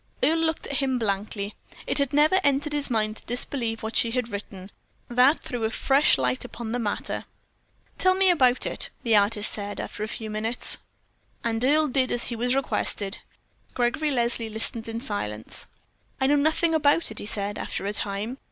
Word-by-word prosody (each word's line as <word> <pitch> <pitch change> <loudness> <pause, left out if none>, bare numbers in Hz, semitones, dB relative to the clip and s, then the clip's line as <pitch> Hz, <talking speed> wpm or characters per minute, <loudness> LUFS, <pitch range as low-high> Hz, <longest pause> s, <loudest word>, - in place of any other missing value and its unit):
Earle 325 +2 +3
looked 320 0 -1
at 280 - 0
him 265 -3 +2
blankly. 205 -1 -2 0.3
It - - 0
had 280 -2 +1
never 305 +6 +4
entered 285 +1 +1
his 290 -1 -2
mind 215 -2 0
to - - -8
disbelieve 235 -2 -3
what 220 +1 -4
she 230 - +4
had 245 0 -1
written. 200 -2 -7 0.4
That 250 +5 +4
threw 245 -2 -4
a 220 - +2
fresh 275 - +3
light 125 -1 0
upon 230 -2 -6
the 245 - -1
matter. 210 -3 -3 0.7
"Tell 370 0 +4
me 385 0 +3
all - - +7
about 255 -6 +3
it," - - 0
the 230 -2 +3
artist 210 +1 +3
said, 205 -1 -3
after - - -6
a - - -2
few 220 0 -6
minutes. 220 +3 +3 0.6
And 230 0 -1
Earle 305 +4 +4
did 260 -1 +1
as 240 - +1
he 240 - -4
was 245 +3 0
requested. 210 -6 -1 0.6
Gregory 250 +5 +1
Leslie 235 -3 0
listened 225 +1 -3
in 225 +1 -4
silence. 110 - -2 0.5
"I 265 - +2
know 285 +2 +4
nothing 315 +3 +2
about 300 -2 +3
it," 215 - -1
he - - -6
said, 205 -1 -3
after - - -4
a 205 - -2
time. 210 +6 -2
235 Hz, 190 wpm, -25 LUFS, 215-280 Hz, 0.7 s, all